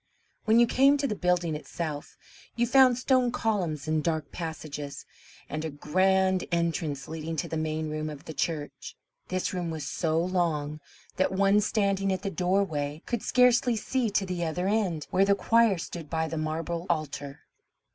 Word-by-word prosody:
When 220 +1 +4
you 240 - +7
came 275 +4 +4
to 285 - -1
the 255 - 0
building 180 -4 +1
itself, 150 -1 -5 0.4
you 240 - +2
found 255 0 +5
stone 255 -1 +2
columns 180 - -1
and 155 -1 +1
dark 155 -3 -1
passages, 155 -4 -6 0.4
and 155 +2 -4
a 160 - -2
grand 185 +5 +2
entrance 165 -4 -1
leading 160 0 -5
to 150 - -2
the - - -4
main 155 0 -2
room 155 0 -3
of 150 -2 -9
the 160 - -7
church. 145 -4 -4 0.3
This 185 +1 -2
room 175 -2 -2
was 160 -3 -4
so 160 +2 0
long 165 -4 -1 0.4
that 185 - +2
one 200 +2 +3
standing 195 -2 +1
at 185 0 -2
the 195 - -2
doorway 165 -5 -1
could 240 -3 -2
scarcely 250 -1 +4
see 240 +2 -1
to 200 -1 0
the 180 -2 -3
other 175 +3 -1
end, 195 -8 0
where 190 - +4
the 200 0 +4
choir 230 -1 +3
stood 165 -2 -7
by 160 -1 -1
the 160 - -4
marble 165 +2 -3
altar. 150 -3 -3
170 Hz, 175 wpm, -28 LUFS, 155-200 Hz, 0.4 s, you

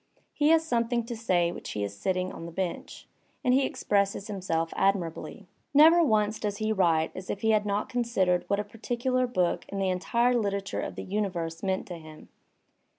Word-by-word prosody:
He 295 - +2
has 320 0 +5
something 235 -3 0
to 235 0 -5
say 180 -6 +1
while - - -8
he 105 - -4
is 100 0 -4
sitting 185 - -1
on 165 - -8
the - - -8
bench, 180 +1 -5 0.4
and 250 - +3
he 265 +1 +3
expresses 200 -1 0
himself 180 -6 -2
admirably. 190 -4 -1 0.3
Never 325 +4 +8
once 215 -5 +2
does 205 -1 -2
he 215 +1 -1
write 165 -5 +2
as 185 0 -8
if 200 - -3
he 220 - +3
had 210 -1 +2
not 205 +1 -1
considered 215 -8 +1
what 200 - +1
a - - 0
particular 245 +4 -1
book 180 -7 0
and 200 - -4
the 190 -1 +1
entire 235 +7 +1
literature 200 -4 -1
of - - -5
the - - -5
universe 180 -5 -3
meant 190 -1 -1
to 175 -2 -7
him. 155 -1 -13
200 Hz, 195 wpm, -28 LUFS, 180-235 Hz, 0.4 s, Never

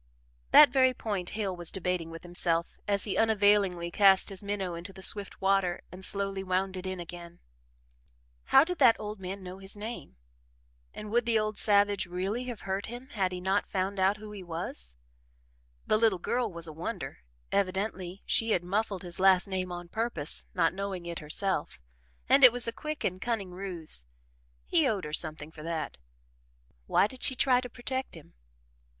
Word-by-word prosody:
That 295 -4 +9
very 260 -1 +4
point 200 -7 -3
Hale 195 -4 -1
was 175 -1 -3
debating 180 -3 -2
with 165 +1 -9
himself 170 -1 -1
as 200 -1 +1
he 205 - -2
unavailingly 205 -5 +3
cast 195 +1 +5
his 195 -2 -4
minnow 200 -3 -3
into 170 +3 -7
the 190 0 -11
swift 200 +1 0
water 190 -2 +2
and 185 +2 -10
slowly 195 0 +1
wound 190 +1 -1
it 185 0 -5
in 185 -1 -4
again. 175 0 -9 1.1
How 270 - +6
did 360 +1 -4
that 250 -5 +6
old 210 -1 -6
man 190 +1 -6
know 185 +1 -8
his 195 +1 -2
name? 215 - -7 0.8
And 210 0 -8
would 240 +1 +1
the 230 -1 +3
old 215 0 -1
savage 205 -2 +3
really 190 +7 -3
have 240 -4 -6
hurt 195 +1 -3
him 245 +3 -9
had 195 -6 -1
he 180 - -4
not 190 +3 0
found 190 +1 -2
out 190 +2 +3
who 215 0 -10
he 205 -2 -8
was? 165 - -5 0.9
The 215 - +2
little 220 -4 +3
girl 240 +7 -1
was 170 -1 -3
a 160 - -6
wonder: 160 +3 -5 0.3
evidently 190 -1 -2
she 225 -1 +2
had 175 - 0
muffled 195 +1 -2
his 175 0 -6
last 190 -1 +5
name 185 -2 -3
on 175 0 -6
purpose 220 -7 -2
not 165 -2 +2
knowing 195 -2 -4
it 170 -1 -5
herself 175 - -2 0.5
and 275 - +5
it 250 - +12
was 245 0 +1
a - - 0
quick 305 +2 -5
and 185 +1 -2
cunning 220 -6 -2
ruse. 175 - -1 0.6
He 155 - +3
owed 200 -4 -1
her 150 - -7
something 155 -1 -1
for 160 - -12
that 160 - -4 0.9
why - - +4
did 255 +4 -7
she 260 - +5
try 250 0 +3
to 250 - -7
protect 260 +1 -4
him? 160 - -14
195 Hz, 185 wpm, -29 LUFS, 175-215 Hz, 1.1 s, it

